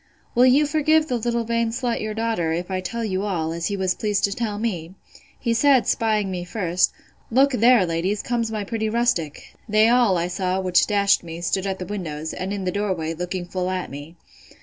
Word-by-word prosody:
Will 250 +2 +5
you 280 +4 +5
forgive 310 +1 +2
the 250 - 0
little 235 0 -1
vain 230 0 0
slut, 240 0 -2
your 215 0 -4
daughter, 225 -8 -1
if 175 +3 -4
I 185 0 -1
tell 230 +5 -4
you 190 -3 -1
all, 175 -6 -2
as 170 0 -2
he 200 - -2
was 190 -1 +1
pleased 210 0 -1
to 200 - +2
tell 215 -2 -3
me? 185 -6 -3 0.4
He 235 -2 0
said, 265 +1 +4
'spying 215 -3 +1
me 180 -1 -3
first, 180 -1 0 0.4
Look, 270 +4 +4
there, 240 -4 +5
ladies, 175 +5 -1
comes 235 -2 -1
my 215 -2 -3
pretty 220 +1 -2
rustic!—They 215 - 0
all, 235 -6 +4
I 170 +1 0
saw, 185 +1 -1
which 185 -1 +3
dashed 200 -1 +3
me, 165 0 -7
stood 190 +3 -1
at 190 -1 -2
the 185 - -6
windows, 160 -6 -5
and 185 +1 -4
in 200 -1 -3
the 180 - 0
door 200 0 -1
way, 160 -1 -3
looking 180 +2 -4
full 180 +1 -3
at 185 -1 -3
me. 145 +4 -9
200 Hz, 215 wpm, -23 LUFS, 180-230 Hz, 0.4 s, Will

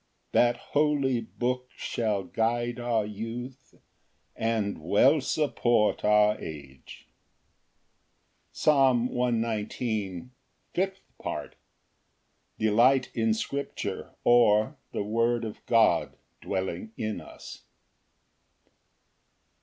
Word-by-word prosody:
That 120 0 +3 0.2
holy 145 -4 +2
book 125 +2 -3
shall 105 -4 -2
guide 120 +3 -1
our 120 -3 0
youth, 120 +5 -7 0.6
And 110 -5 -1
well 130 - +4
support 120 -6 +1
our 105 0 +4
age. 70 -4 -10 1.4
Psalm 130 -5 +3
119:05. 115 -4 -2 0.4
Fifth 190 +1 -1 0.2
Part. - - -5 1.0
Delight 120 +5 +3
in 110 -1 +1
scripture; 140 +5 -4
or, 110 -3 +4 0.2
The - - -2
word 115 +2 0
of 110 - -8
God 110 -8 +3 0.2
dwelling 95 +3 -4
in 110 -1 -3
us. - - -12
115 Hz, 85 wpm, -27 LUFS, 105-125 Hz, 1.4 s, well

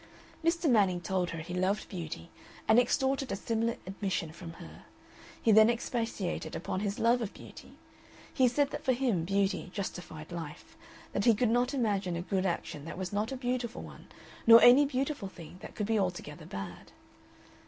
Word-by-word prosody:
Mr. 335 0 +2
Manning 200 -8 +4
told 180 0 -1
her 165 - -5
he 170 +3 -7
loved 185 +3 0
beauty, 170 -2 -7 0.4
and 220 - +7
extorted 265 +2 +1
a - - 0
similar 230 +3 -1
admission 190 -4 -3
from 165 0 -9
her; - - -12 0.5
he 225 - +3
then 215 +1 +7
expatiated 225 -8 -2
upon 185 - -3
his 200 0 -2
own - - -3
love 240 +1 +4
of 215 - -4
beauty. - - -12 0.6
He 255 - +4
said 280 +3 +1
that - - -5
for 260 - +3
him 240 -10 0
beauty 195 0 0
justified 175 -5 -6
life, 170 - -8 0.4
that 200 - 0
he 230 -3 +6
could 235 +2 +2
not 245 +3 +2
imagine 200 -8 0
a 170 - -3
good 190 0 0
action 160 -4 -3
that 165 - -7
was 185 0 -4
not 210 +4 -1
a 265 - -3
beautiful 245 -1 -2
one - - -12 0.4
nor 230 0 +11
any 255 +4 +8
beautiful 275 -4 -2
thing 175 0 -12
that - - -10
could 210 - -1
be 220 0 +1
altogether 180 -6 -3
bad. 95 -2 -7
205 Hz, 185 wpm, -31 LUFS, 180-245 Hz, 0.6 s, nor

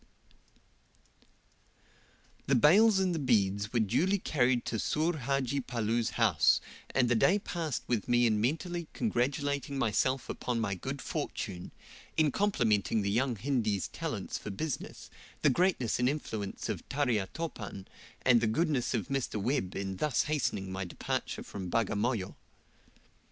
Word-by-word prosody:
The 140 - +4
bales 195 - +6
and 190 -2 +2
the 165 - -1
beads 100 -5 +1
were 120 - +1
duly 140 - +2
carried 125 -8 +1
to 110 - -2
Soor 160 +8 0
Hadji 140 0 -1
Palloo's 115 -1 -1
house, - - +4 0.3
and 125 -2 +2
the 120 - +3
day 180 - +4
passed 165 - -3
with 120 -1 -1
me 120 0 +4
in 110 -2 +2
mentally 165 - -1
congratulating 140 - -1
myself 130 +2 +1
upon 120 -2 -2
my 110 -4 -1
good 90 - -5
fortune, 90 -2 -4 0.5
in 155 -2 +4
complimenting 115 - +1
the 100 - 0
young 120 +3 +1
Hindi's 110 - -1
talents - - -4
for - - -7
business, 140 +9 -5 0.3
the 150 - +6
greatness 130 - +1
and 125 +1 +3
influence 110 -9 -4
of - - -3
Tarya 125 -8 +1
Topan, 105 - -6 0.4
and 125 -2 +5
the 115 - +2
goodness 140 0 +1
of 110 -5 -3
Mr. 135 -5 -1
Webb 100 -4 -1
in 95 -1 -3
thus 150 +6 +1
hastening 115 -11 -1
my 95 0 -3
departure 90 - -3
from 95 -3 -6
Bagamoyo. 105 0 0
125 Hz, 140 wpm, -31 LUFS, 105-150 Hz, 0.5 s, bales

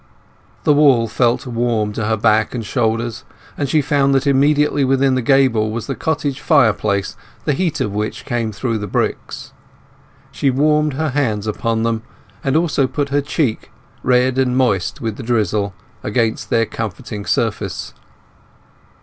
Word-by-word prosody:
The 150 - +4
wall 135 -6 +4
felt 120 +3 +1
warm 115 -3 -1
to 105 0 -2
her 110 0 +1
back 110 +1 +2
and 115 -3 -4
shoulders, 115 0 -1 0.3
and 140 -2 -2
she 155 -1 +2
found 140 -1 +2
that 135 +1 +1
immediately 145 +1 +3
within 135 0 +2
the 130 - +1
gable 125 -4 +3
was 110 0 -4
the 135 - -3
cottage 145 -2 -2
fireplace, 105 - +2 0.3
the 150 - +2
heat 165 +1 -1
of 100 - -1
which 105 +1 -3
came 120 -4 -1
through 115 +2 -2
the 105 - -4
bricks. - - -3 0.8
She 140 - 0
warmed 150 +2 +2
her 155 +3 -1
hands 120 -7 -1
upon 115 +1 -1
them, 115 -1 0 0.4
and 135 +1 0
also 155 -5 +1
put 145 +1 -2
her 145 +1 +1
cheek—red 130 -2 -1
and 125 -1 +1
moist 105 -9 0
with 110 -3 -3
the 130 - -7
drizzle—against 105 0 -2
their 115 0 +2
comforting 110 -1 -6
surface. - - -2
120 Hz, 150 wpm, -18 LUFS, 110-140 Hz, 0.8 s, The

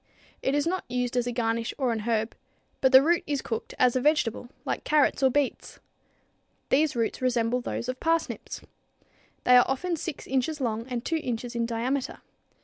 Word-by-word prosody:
It 270 - 0
is 290 - +1
not 370 +2 -1
used 250 0 -1
as 245 -1 +1
a - - -1
garnish 230 -1 -1
or 260 -4 +1
an 225 - -1
herb, 220 0 -1 0.5
but 265 - +4
the 260 0 +8
root 340 +3 +2
is 285 -2 -1
cooked 225 -2 -4
as 250 -1 +3
a 255 - +1
vegetable 250 -5 +1 0.2
like - - -2
carrots 300 -2 +2
or 265 - +5
beets. 285 +1 -2 0.9
These 295 +1 +3
roots 230 +1 -1
resemble 245 -1 +1
those 240 - -4
of 255 0 -4
parsnips. 330 0 -1 0.8
They 250 - +6
are 245 - +7
often 335 +7 -1
6 320 -1 -6
inches 270 +4 -1
long 230 -2 -2
and 245 -2 -4
2 325 - 0
inches 245 -4 -4
in 235 0 0
diameter. 250 +4 -2
255 Hz, 185 wpm, -27 LUFS, 235-285 Hz, 0.9 s, the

